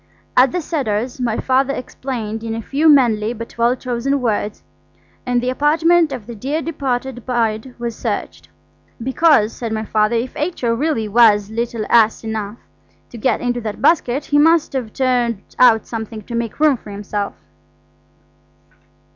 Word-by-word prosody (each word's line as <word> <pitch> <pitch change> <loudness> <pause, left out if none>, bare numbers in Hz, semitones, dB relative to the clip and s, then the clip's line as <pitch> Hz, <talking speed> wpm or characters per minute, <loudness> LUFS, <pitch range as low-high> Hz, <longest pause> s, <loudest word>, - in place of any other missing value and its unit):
At 255 0 +5
the 360 - -2
Cedars 255 -6 -2
my 235 -3 0
Father 265 +1 +1
explained 230 -4 -5
in 225 -1 -3
a 225 - -4
few 300 +7 +2
manly 235 -6 +4
but 230 0 -9
well 235 +2 +3
chosen 255 +2 -2
words, 215 -4 -2 0.6
and 245 -1 +1
the 250 - 0
apartment 320 +4 +3
of 250 -6 -6
the 235 - -8
dear 270 +8 -3
departed 265 -6 -3
bride 235 0 -1
was 235 -1 -4
searched. - - -4 0.5
"Because," 265 -4 +3
said 230 -2 -5
my 220 0 -2
Father, 215 +2 +1
"if 235 +2 -2
H.O. 295 -7 -1
really 250 -3 -1
was 210 -2 +4
little 230 -1 -3
ass 225 -1 +3
enough 220 -1 -4 0.5
to 235 - -9
get 255 - +1
into 245 0 -1
that 215 -2 -5
basket, 285 -4 +2
he 290 - +2
must 325 0 +3
have 250 -5 -3
turned 245 -5 0 0.2
out 225 -3 +5
something 220 -1 -6
to 235 - -9
make 235 +1 -3
room 300 -4 +4
for 215 - -13
himself." 205 0 -4
240 Hz, 160 wpm, -19 LUFS, 220-270 Hz, 0.6 s, At